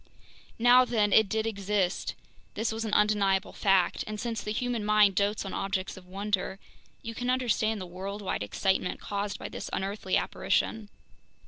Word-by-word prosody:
Now 245 +2 +7
then, 215 -5 +1
it 220 -3 +5
did 220 +2 0
exist, 200 -3 -1 0.4
this 220 +2 -1
was 225 +1 -3
an 215 - -4
undeniable 205 -2 +2
fact; 195 -3 +2
and 215 0 -5
since 230 -2 -3
the 210 - -4
human 240 0 -1
mind 210 -1 +5
dotes 200 +2 0
on 195 - -5
objects 195 -1 -2
of 185 -1 -13
wonder, 195 0 -2 0.5
you 230 - -5
can 245 +2 -3
understand 230 -4 +1
the 185 - -5
worldwide 190 - -4
excitement 180 - 0
caused 205 0 -3
by - - -6
this - - -6
unearthly 195 0 -1
apparition. 220 -2 -1
205 Hz, 160 wpm, -29 LUFS, 195-220 Hz, 0.5 s, Now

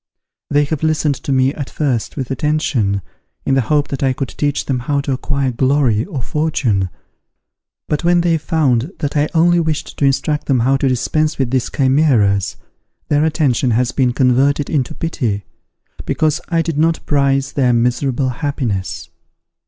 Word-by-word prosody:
They 145 0 +3
have 145 0 -3
listened 155 -2 +1
to - - -5
me 130 +1 +2
at 145 -3 -6
first 135 -6 -2
with 130 -2 -4
attention, 130 - 0 0.4
in 135 - +1
the 135 - +3
hope 145 +5 0
that 140 - -4
I 135 -1 +2
could 130 -1 -4
teach 145 -1 -2
them 130 -2 -1
how 140 +3 -1
to 140 - -3
acquire 135 0 -1
glory 130 -3 +2
or 150 - -5
fortune, 125 - 0 1.0
but 150 - -1
when 175 0 +3
they 170 -2 +1
found 150 - 0
that 145 0 -3
I 150 +1 +2
only 175 +1 +4
wished 160 -2 -2
to 140 - +3
instruct 150 +2 0
them 130 -4 +2
how 130 +3 +3
to 135 0 +1
dispense 150 +5 0
with 130 -3 -1
these 130 -2 0
chimeras, 130 - +2 0.5
their 145 +1 +3
attention 145 -6 +1
has 125 -1 +1
been 130 -3 +1
converted 135 +3 +2
into 135 -6 -1
pity, 115 - -2 0.6
because 155 +1 0
I 165 -1 +1
did 165 -3 -2
not 165 +1 +1
prize 140 -1 +1
their 130 -3 +2
miserable 125 +3 +1
happiness. 115 - -3
140 Hz, 170 wpm, -17 LUFS, 125-150 Hz, 1.0 s, only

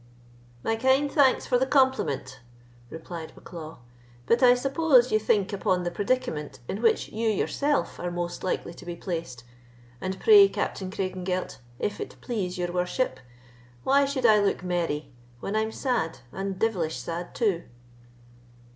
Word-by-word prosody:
"My 225 - 0
kind 265 +4 +3
thanks 275 -4 +4
for 245 - +2
the 260 - +1
compliment," 260 - +1 0.5
replied 160 +1 -8
Bucklaw; 160 -2 -9 0.5
"but 235 - +3
I 250 -1 +7
suppose 270 -1 +3
you 215 - +4
think 205 -2 +1
upon 185 -2 0
the 175 - -2
predicament 170 - -2
in 200 - -4
which 230 -2 +2
you 225 +1 -1
yourself 280 +7 0
are 175 - -2
most 175 0 -4
likely 185 -2 -2
to - - -12
be 175 -1 -5
placed; 165 -9 -5 0.6
and 190 0 -3
pray, 410 -2 +8
Captain 190 -1 -3
Craigengelt, 185 -3 -3 0.2
if 205 - -3
it - - -6
please 195 -6 -3
your 175 -1 -2
worship, 180 +8 -1 0.6
why 280 +1 +4
should 275 -2 -2
I 215 -2 +7
look 200 -3 0
merry, 170 -4 -2 0.3
when 200 - -4
I'm 220 0 0
sad, 230 - -1
and 195 0 -4
devilish 185 -8 0
sad 170 +1 -5
too?" 200 -8 0
195 Hz, 150 wpm, -26 LUFS, 175-250 Hz, 0.6 s, pray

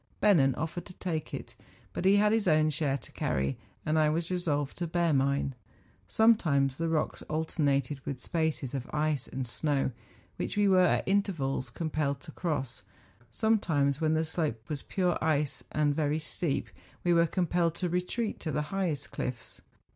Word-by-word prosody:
Bennen 145 -11 +4
offered 160 +3 -4
to 180 - -12
take 160 -5 -3
it; - - -6 0.4
but - - -3
he 195 +1 +6
had 210 +1 +4
his 220 -3 +2
own 155 -1 +4
share 145 -3 0
to 120 - -11
carry, 70 0 -1 0.3
and 155 +1 +2
I 155 -1 +4
was 165 +3 -1
resolved 145 -6 -1
to 175 - -1
bear 170 -1 +1
mine. 140 0 +1 0.5
Sometimes 155 - +3
the 165 0 0
rocks 155 -2 -1
alter¬ 160 +2 -3
nated 140 -2 +1
with 135 -3 -4
spaces 160 -4 -1
of 130 -2 -4
ice 150 -3 0
and 130 0 -4
snow, 135 +3 0 0.5
which - - -3
we 205 -1 +4
were 190 -1 +5
at - - +1
intervals 165 -10 0
compelled 150 -1 -1
to 165 - -10
cross; 145 - -3 0.5
sometimes 160 - +1
when 155 0 +2
the 160 +1 +1
slope 150 -9 -2
was 145 -2 -3
pure 180 -4 0
ice 150 -2 0
and 150 -1 +2
very 150 0 +1
steep, 155 -1 -2 0.3
we 175 - +3
were 170 0 +4
compelled 175 -1 +1
to 180 - -1
retreat 180 +6 -2
to 155 - -3
the 150 - 0
highest 180 -7 -1
cliffs. 125 -2 -5
155 Hz, 175 wpm, -30 LUFS, 140-175 Hz, 0.5 s, he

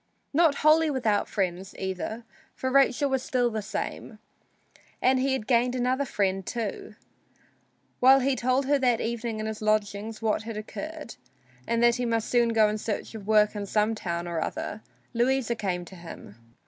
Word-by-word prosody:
Not 315 -1 +4
wholly 315 +1 +6
without 230 -7 0
friends, 190 -1 -2
either, 190 +5 -4 0.3
for 260 - -2
Rachel 275 +1 +4
was 265 -2 0
still 245 -2 0
the 215 -1 -2
same. 215 +1 -5 0.8
And 260 0 +3
he 265 +1 +1
had 260 -5 -2
gained 245 +1 +2
another 255 +3 0
friend, 195 -5 -1
too. 220 0 -5 1.0
While 265 +2 +7
he 270 +1 +1
told 255 +2 +1
her 285 +1 +2
that 245 -3 +2
evening 230 -1 -3
in 215 - -3
his 220 0 -5
lodgings 215 0 -1
what 220 -2 0
had 225 -1 -6
occurred, 305 +6 -7 0.5
and 235 0 +1
that 240 0 +5
he 245 -1 -1
must 230 -1 -1
soon 240 -1 +3
go 220 -2 +4
in 210 +1 -2
search 210 +1 -4
of 210 -3 -9
work 210 -1 +4
in 205 -1 -4
some 210 +2 +2
other 170 -1 -2 0.3
town, 215 - -5 0.3
Louisa 245 0 +1
came 185 -6 -3
to 190 - -12
him. 170 - -11
230 Hz, 175 wpm, -27 LUFS, 210-255 Hz, 1.0 s, While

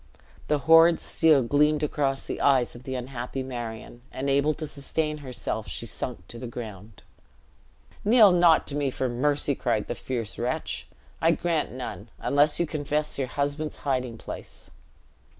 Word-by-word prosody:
The 150 - +2
horrid 165 +1 +7
steel 155 -5 +3
gleamed 150 +4 +2
across 140 -2 0
the - - -5
eyes 130 -4 +3
of 120 +1 -13
the 130 - -4
unhappy 125 +1 -4
Marion; 120 -2 -7
unable 140 +3 +1
to 155 - -5
sustain 150 +1 -3
herself, 130 -4 -4
she - - -5
sunk 90 - -5
to 120 - -8
the 125 - -6
ground. 110 -3 -9 1.0
"Kneel 215 -2 +7
not 175 -2 +5
to 145 - -3
me 145 -2 0
for 130 0 -2
mercy!" 140 +4 +1
cried 115 -5 -1
the - - -2
fierce 115 -5 -5
wretch; 120 +2 -2 0.3
"I 165 - +4
grant 165 -2 0
none, 125 -3 -7
unless 145 +2 +2
you 170 - +2
confess 150 -1 -2
your 135 - 0
husband's 145 +3 -2
hiding 125 -4 -1
place." - - -9
140 Hz, 155 wpm, -26 LUFS, 125-150 Hz, 1.0 s, horrid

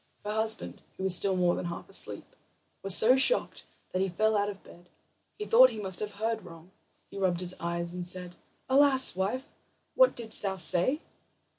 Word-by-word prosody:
Her 210 - -3
husband, 220 0 -1 0.2
who - - -6
was 190 -1 +2
still 195 +1 +2
more 180 -1 +2
than - - -4
half 170 0 -7
asleep, - - -3 0.5
was 195 -1 +2
so 245 +4 +5
shocked 280 - +1 0.3
that 185 - -2
he 195 - 0
fell 215 +5 0
out 205 0 0
of 195 -1 -10
bed. 175 +1 -17 0.5
He 420 - -5
thought 255 - +6
he 225 -3 -8
must 190 -3 -5
have 210 -1 -4
heard 220 +1 -3
wrong. 170 0 -14 0.4
He 200 - -8
rubbed 180 -3 0
his 180 0 0
eyes 170 0 -4
and 180 0 -5
said: 180 0 -2 0.3
"Alas, 265 -3 +3
wife, 210 +9 -3 0.5
what - - +4
didst 225 -2 +1
thou 195 -2 -2
say?" 185 - +2
195 Hz, 190 wpm, -28 LUFS, 180-225 Hz, 0.5 s, thought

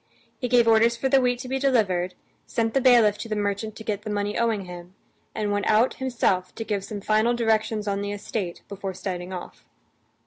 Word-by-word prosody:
He 250 - -1
gave 240 -1 +4
orders 230 +1 +4
for 265 +3 0
the 270 0 +5
wheat 245 -1 +1
to 255 - -7
be 265 +1 -1
delivered, 190 -10 +1 0.3
sent 225 -1 -1
the 270 - +2
bailiff 235 -5 +5
to 230 - -6
the 215 - -1
merchant 205 +1 -2
to 220 - -9
get 210 -2 -2
the 215 - -7
money 205 0 -1
owing 225 -4 0
him, 180 +1 -10 0.4
and 210 -1 -1
went 205 0 0
out 225 +4 +4
himself 225 -8 0
to 225 - -4
give 205 -3 -2
some 205 0 -6
final 215 +3 +2
directions 220 -2 0
on 200 0 -1
the 205 0 -3
estate 200 -3 -4
before 195 -2 -6
setting 180 -1 -5
off. 180 -1 -8
215 Hz, 210 wpm, -25 LUFS, 200-235 Hz, 0.4 s, the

